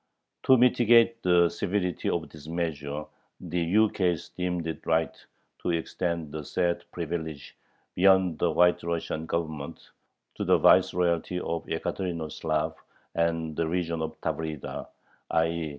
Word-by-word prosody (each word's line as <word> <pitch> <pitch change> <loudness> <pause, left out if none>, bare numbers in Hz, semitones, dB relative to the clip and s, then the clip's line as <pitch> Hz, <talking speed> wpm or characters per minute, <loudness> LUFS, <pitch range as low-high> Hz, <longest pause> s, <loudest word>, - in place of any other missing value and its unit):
To 130 - +8
mitigate 115 -1 +5
the 90 -1 +5
severity 90 +1 -1
of 80 -3 -1
this 75 +1 -13
measure 75 -3 -3 0.3
the 90 -1 -3
ukase 90 -2 +1
"deemed 90 -2 -3
it 80 -1 -5
right 80 -2 +1 0.4
to - - -3
extend 85 -1 -2
the 75 0 -5
said 85 +2 -1
privilege 80 -3 -5 0.4
beyond 95 -3 +4
the - - +2
White 90 0 +4
Russian 85 -1 -3
Government, 80 -4 -4 0.5
to - - -2
the - - +4
vice 95 0 +5
royalty 90 0 0
of 85 -1 -3
Yekaterinoslav 80 -3 -2 0.4
and 80 -2 0
the 85 0 0
region 85 -1 -1
of 80 0 -5
Tavrida," 80 -3 -4 0.4
_i. 80 -1 +1
85 Hz, 130 wpm, -27 LUFS, 80-90 Hz, 0.5 s, To